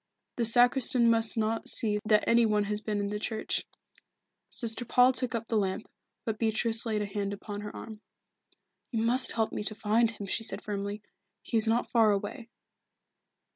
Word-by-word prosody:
The 235 - +1
sacristan 245 0 +4
must 225 0 +1
not 225 +1 -1
see 210 -2 0
that 215 0 +3
any 235 0 +4
one 210 -2 +1
has 210 +1 -3
been 210 -1 -3
in 200 0 -2
the 210 - -3
church." 220 0 -3 0.8
Sister 230 0 +2
Paul 250 +2 +4
took 250 -2 -1
up 225 0 -4
the 225 - 0
lamp, 195 +2 -3 0.4
but 220 -2 -3
Beatrice 225 +1 +2
laid 215 -2 -1
a - - -3
hand 200 0 -4
upon 205 0 -7
her 210 - -8
arm. 220 -1 -10 0.9
"You 225 -3 -2
must 250 +3 +4
help 225 -1 -1
me - - -4
to 215 +1 0
find 220 +2 +1
him," 210 -3 -8
she 195 - -1
said 210 -2 -1
firmly. 205 0 -5 0.4
"He - - -5
is 220 0 +2
not 230 +2 0
far 225 -3 +4
away." 205 +4 -4
220 Hz, 185 wpm, -28 LUFS, 210-230 Hz, 0.9 s, sacristan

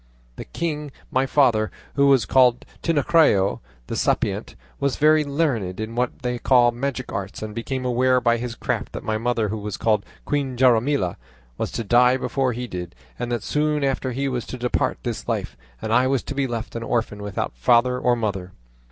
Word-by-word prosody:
The - - -7
king 150 -3 -3 0.2
my 130 +1 +1
father, 115 -7 +3 0.2
who 140 0 +3
was 135 -6 +4
called 125 +3 +4 0.2
Tinacrio 150 - +3 0.3
the - - -5
Sapient, - - -1 0.2
was 140 -2 0
very 155 +1 +4
learned 140 - -1
in 110 +1 -4
what 125 +1 -2
they 125 -1 -2
call 120 -2 +4
magic 130 +1 -4
arts, 100 +2 -5
and 110 -1 -5
became 130 +3 -4
aware 125 +1 +3
by 120 -1 +2
his 120 0 -5
craft - - -3
that - - -6
my 110 -1 -1
mother, 115 -2 0
who 110 +2 -3
was 105 0 -5
called 105 -3 +1 0.2
Queen 140 -3 -1
Jaramilla, 120 -6 +3 0.4
was - - -3
to 115 - -2
die 125 +3 +4
before 135 0 0
he 125 +2 -4
did, 90 - -7 0.2
and 120 0 -3
that 120 - -1
soon 150 0 0
after 135 -1 0
he 135 +3 -3
too 135 - 0
was 125 -2 -3
to 130 - -6
depart 125 0 0
this - - -4
life, - - -2 0.3
and 110 - -1
I 125 +2 +4
was 135 -1 +1
to - - -5
be 140 -1 0
left 115 -2 -5
an 115 - -3
orphan 115 -3 -2
without 100 -11 -3
father 120 - +3
or 125 -1 +2
mother. 95 -5 -3
125 Hz, 195 wpm, -23 LUFS, 110-135 Hz, 0.4 s, was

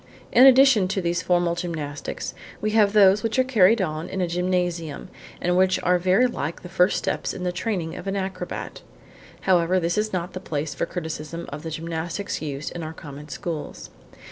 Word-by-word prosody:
In 255 +3 +8
addition 260 -7 +6
to 195 +1 -1
these 170 -1 0
formal 175 -1 +2
gymnastics 155 -5 -5 0.3
we 215 - -1
have 210 -2 +4
those 200 -1 +6
which 225 +3 -1
are 260 - +5
carried 225 -4 +4
on 155 -1 -4
in 190 - -4
a 180 - +1
gymnasium, 175 -3 -2 0.3
and 180 0 +1
which 185 0 +3
are 180 0 +3
very 185 +7 +3
like 170 - -3
the 180 - -8
first 180 +1 +3
steps - - -2
in 180 - -6
the 180 - 0
training 175 -3 -3
of 195 - -8
an 195 - -1
acrobat. 190 -2 -5 0.6
However, 185 0 +3
this 170 +3 0
is 215 0 -1
not 180 -1 -3
the 185 - -5
place 150 -4 -3
for - - -2
criticism 160 0 -5
of 145 +1 -7
the 165 - -5
gymnastics 165 +4 -4
used 145 -1 -4
in 175 - -6
our 160 0 -5
common 150 -1 -10
schools. 150 - -6
180 Hz, 195 wpm, -24 LUFS, 165-195 Hz, 0.6 s, In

